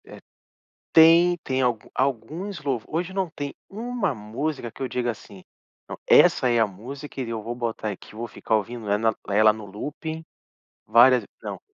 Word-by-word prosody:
É, - - -12 0.7
tem 170 +2 +7
tem 130 0 -1
algu 120 -4 -1
alguns 145 - -2
louvores 135 -6 -2 0.2
hoje 190 - -10
não 190 -2 -1
tem 145 -2 -6 0.2
uma 225 - -2
música 120 +4 -4
que - - -14
eu 130 - -1
digo 120 0 -2
assim: 100 -4 -8 0.5
"Não, - - -6
essa 130 - +6
é 120 -1 +3
a 115 - +4
música 130 +9 -9
e 120 - -4
eu 115 -1 -3
vou 120 +3 -5
botar 115 -3 -3
aqui, 100 - -11
vou 120 +2 -5
ficar 110 - -1
ouvindo 110 0 -3
ela 110 +2 +2
ela 110 +2 +5
no 110 -1 -9
looping, 150 - -6 0.6
várias 120 +3 +6
ve". - - -15 0.2
Não, - - -5
120 Hz, 180 wpm, -24 LUFS, 110-155 Hz, 0.7 s, tem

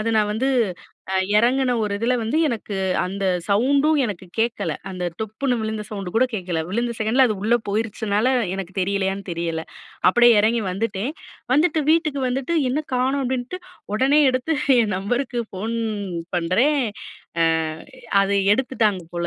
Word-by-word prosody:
அத 225 +1 0
நான் 210 0 +1
வந்து 255 +5 0 0.9
எறங்குன 250 +2 +2
ஒரு 210 -1 -1
இதுல 240 +3 +1
வந்து 230 +9 0
எனக்கு 220 -5 -3 0.3
அந்த 195 +2 -4 0.2
சவுண்டும் 280 +9 +3
எனக்கு 190 -4 -5
கேக்கல. 225 -8 0 0.2
அந்த 180 -1 -4 0.2
டொப்புன்னு 230 +4 -1
விழுந்த 220 -1 -3
சவுண்ட் 195 -4 -5
கூட 255 - +5
கேக்கல. 180 -5 -2
விழுந்த 235 +3 -1
செகண்ட்ல 230 +5 +3
அது 215 - 0
உள்ள 230 +3 +3
போயிருச்சுனால 215 +2 0 0.2
எனக்கு 190 -1 -6
தெரியலையான்னு 195 +1 -1
தெரியல. 165 -1 -2 0.5
அப்டியே 240 -1 +6
எறங்கி 225 +2 +2
வந்துட்டேன். 220 +6 -2 0.4
வந்துட்டு 310 +2 +3
வீட்டுக்கு 310 -4 +2
வந்துட்டு, 270 +6 -2 0.2
என்ன 300 +4 0
கானோம் 265 +2 +1
அப்டின்ட்டு, 255 +7 -3 0.4
ஒடனே 270 +7 +3
எடுத்து 255 +5 -1 0.3
என் 210 -4 0
நம்பருக்கு 240 +5 -1
ஃபோன் 220 +5 -4 0.6
பண்றேன். 230 - +2 0.6
அ - - +5 0.8
அத 195 - -1 0.2
எடுத்துட்டாங்க 220 -7 0
போல 175 0 -1
225 Hz, 140 wpm, -22 LUFS, 200-260 Hz, 0.9 s, அப்டியே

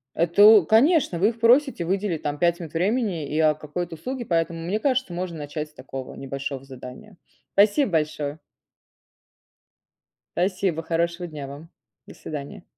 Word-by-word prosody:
Это, 170 +4 +2
о 210 -4 +8
конечно, 245 - +3
вы 200 +4 +4
их 230 0 -8
просите 245 - +3
выделить 190 -3 -1
там 145 0 -2
5 170 0 +2
минут 165 -2 -8
времени 185 - 0
и, 150 +3 -2
о, 155 -1 +4
какой-то 165 +3 -5
услуге, 250 +9 -5
поэтому, 165 -2 0
мне 185 +6 -2
кажется, 260 -6 0
можно 175 -2 -4
начать 150 +1 -5
с 150 - -27
такого 130 -3 -8
небольшого 135 0 -5
задания. 135 +9 -11 0.4
Спасибо 205 +4 +4
большое. 150 -2 -1 2.0
Спасибо. 180 -3 0
Хорошего 170 +2 -1
дня 150 -4 -7
вам. 145 +4 -10 0.4
До - - -12
свидания. 155 +6 -8
170 Hz, 150 wpm, -24 LUFS, 150-205 Hz, 2.0 s, о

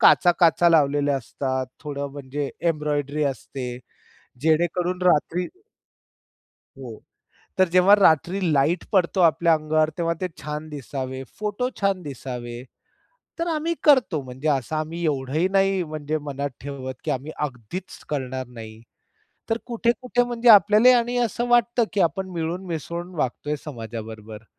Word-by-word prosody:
काच-काचा 175 -1 +5
लावलेल्या 145 -2 +3
असतात. 130 +1 -3
थोडं 140 -1 -4
म्हणजे 140 0 -4 0.2
एम्ब्रॉयडरी 150 -1 -2
असते 130 -2 -4 0.6
जेणेकरून 175 +3 +1
रात्री 180 +1 +2 1.3
हो. 120 -5 -9 0.6
तर 185 - +5
जेव्हा 180 +3 +5
रात्री 180 0 +3
लाईट 150 +5 +2
पडतो 190 -1 +2
आपल्या 170 0 +4
अंगावर, 155 0 +1
तेव्हा 170 -1 0
ते 185 - 0
छान 150 +1 -5
दिसावे, 135 -2 -5 0.2
फोटो 210 +4 -1
छान 195 -2 +1
दिसावे. 125 -4 -6 0.8
तर 335 - -1
आम्ही 325 +1 0
करतो 250 - +4
म्हणजे 130 +4 -5
असं 140 +2 -1
आम्ही 160 +2 -3
एवढंही 150 +3 0
नाही 195 -1 +2
म्हणजे 155 -1 -3
मनात 140 0 -3
ठेवत, 135 -2 -6
की - - -1
आम्ही 135 +4 -4 0.2
अगदीच 130 - -8
करणार 130 -3 -3
नाही. 110 -2 -11 0.7
तर 225 - +1
कुठे-कुठे 240 +1 0
म्हणजे 240 0 +1
आपल्यालाही 215 +4 +7
आणि 240 +1 +1
असं 235 +3 -3
वाटतं, 240 0 +3
की 205 - 0
आपण 185 +3 0
मिळून-मिसळून 170 0 -4
वागतोय 150 +1 -2
समाजाबरोबर, 110 -4 -8
155 Hz, 125 wpm, -24 LUFS, 135-185 Hz, 1.3 s, आपल्यालाही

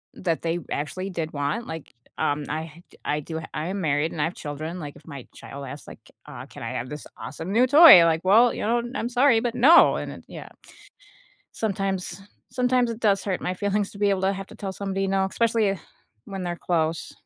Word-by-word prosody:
that 170 -4 -2
they 170 +1 -1
actually 185 +6 -3
did 165 -4 -4
want. 145 +12 -2
Like, 160 -4 -8 0.2
um, 145 0 -1
I 160 +2 -6 0.2
I 150 - 0
do 160 +2 -6
I 155 +4 -3
am 195 +1 -3
married, 150 0 0
and 150 - -4
I - - +2
have 170 - -4
children, 155 +4 -6
like, 145 -3 -7
if 145 - -17
my 140 -5 -9
child 140 0 -9
asks, 140 +3 -9
like, - - -11 0.3
uh, - - -9
"Can - - -11
I - - -4
have 125 - -4
this 150 0 -8
awesome 170 +4 -7
new 245 +4 +4
toy?" 290 - +10
Like, 165 0 +2
"Well, 225 +6 +5
you - - -5
know, 235 +2 +1
I'm 235 - -2
sorry, 245 -1 +4
but 240 -1 -2
no," 285 +8 +6
and - - -5
it - - -12
yeah. - - -10 1.0
Sometimes 195 -3 -3 0.3
sometimes 250 -1 +1
it 230 +1 -6
does 200 -3 +2
hurt 190 -3 -2
my 180 - -2
feelings 205 +1 -1
to 200 - -12
be 205 -1 +2
able 190 -1 0
to 195 +1 +2
have 195 0 -6
to - - -13
tell 195 -2 -5
somebody 195 0 -3
no, 195 0 +1
especially 215 -2 +1 0.5
when 195 -2 -6
they're 175 -1 -3
close. 165 -2 -1
190 Hz, 215 wpm, -24 LUFS, 160-210 Hz, 1.0 s, toy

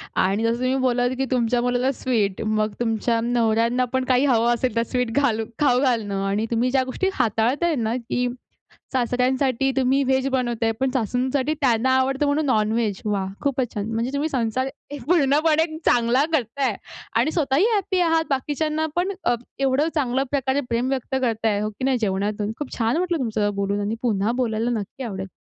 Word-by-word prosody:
आणि 195 +4 +1
जसं 230 +1 +2
तुम्ही 255 +1 +1
बोललात, 245 0 +1
की 270 - 0
तुमच्या 240 -1 +1
मुलाला 245 +2 +1
स्वीट, 215 -7 0
मग 215 -1 0
तुमच्या 230 0 0
नवऱ्यांना 235 +1 +1
पण 260 0 +1
काही 255 +3 +3
हवं 240 -2 +3
असेल 240 -1 -1
तर 230 - +2
स्वीट 250 -2 0
घालू 225 -6 +1
खाऊ 250 -4 +3
घालणं. 210 -7 0
आणि 205 +3 0
तुम्ही 240 +2 +1
ज्या 265 -1 +2
गोष्टी 320 +9 -1
हाताळताय 250 +10 +1
ना, 230 -1 -1
की 245 +1 -2 0.7
सासऱ्यांसाठी 255 +1 +1
तुम्ही, 265 +1 +3
व्हेज 265 +1 +1
बनवताय, 240 -3 0
पण 265 0 +1
सासूंसाठी 260 +4 0
त्यांना 245 -1 +2
आवडतं 270 +2 +1
म्हणून 290 +1 +1
नॉन-व्हेज, 215 -3 0
वाह! 200 -2 -1
खूपच 265 -4 -1
छान. 210 +1 -3
म्हणजे 235 +4 -1
तुम्ही 295 +3 -1
संसार 255 0 -1 0.2
एक 285 -4 -7
पूर्णपणे 310 0 +3 0.2
चांगला 245 +3 +3
करताय 265 0 0 0.4
आणि 310 - +2
स्वतःही 300 - +2
हॅपी 385 -2 0
आहात. 325 -2 +3
बाकीच्यांना 305 +3 -1
पण 365 +3 0
अ, 240 - +2 0.2
एवढं 275 +3 +2
चांगल्या 265 -2 +1
प्रकारे 270 0 0
प्रेम 240 +2 0
व्यक्त 265 0 -2
करताय 220 -3 0
हो 215 - -1
की 215 +5 -5
नाही 265 -2 +2
जेवणातून. 205 +1 -1
खूप 295 - -6
छान 230 +5 +1
वाटलं 350 -1 0
तुमचं 215 -5 -1
बोलून 200 +1 -1
आणि 210 +2 -2
पुन्हा 215 -2 +1
बोलायला 225 0 0
नक्की 235 +7 -7
आवडेल. 195 -4 -5
250 Hz, 175 wpm, -23 LUFS, 225-270 Hz, 0.7 s, काही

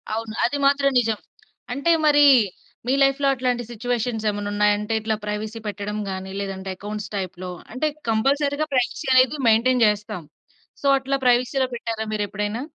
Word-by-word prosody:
అవును. 225 -1 -4
అది 245 +5 -1
మాత్రం 275 0 +3
నిజం. 225 -2 -1 0.5
అంటే 280 +5 +1
మరి 290 -1 +6 0.6
మీ 260 - +2
లైఫ్‌లో 275 +1 +2
అట్లాంటి 250 -2 -1
సిట్యుయేషన్స్ 235 -1 -2
ఏమన్నున్నాయా? 205 0 +1
అంటే 210 +2 -3
ఇట్లా 220 0 0
ప్రైవసీ 210 +2 -4
పెట్టడం 210 0 -4
గాని, 190 0 -5
లేదంటే 195 -1 -5
అకౌంట్స్ 210 0 -6
టైప్‌లో 185 -1 -5 0.2
అంటే 280 +5 0 0.2
కంపల్సరీ‌గా 280 +6 +1
ప్రైవసీ 260 +2 0
అనేది 255 +3 +4
మెయింటైన్ 245 +2 +3
చేస్తాం. 210 -3 -2 0.6
సో, - - -8
అట్లా 270 +1 -1
ప్రైవసీ‌లో 250 +2 +3
పెట్టారా 225 -1 -3
మీరెప్పుడైనా? 210 +2 -2
225 Hz, 140 wpm, -23 LUFS, 210-260 Hz, 0.6 s, మరి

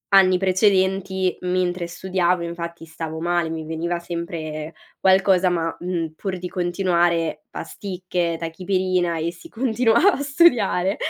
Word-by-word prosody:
anni 185 -1 +6
precedenti 190 0 +2
mentre 180 -1 -1
studiavo, 180 0 0
infatti 170 -1 -6
stavo 160 0 -6
male, 175 -1 0
mi 160 -1 -5
veniva 170 +2 -2
sempre 165 -2 -5 0.3
qualcosa, 190 -1 +4
ma, 165 -2 -1
mhmm, 170 -3 -3
pur 190 0 -4
di 180 - -4
continuare: 175 -3 0
pasticche, 180 -1 -3
tachipirina 180 0 -1
e 170 +2 -2
si 175 - -14
continuava 240 - +3
a 285 - -3
studiare. 240 - +3
180 Hz, 125 wpm, -22 LUFS, 170-190 Hz, 0.3 s, anni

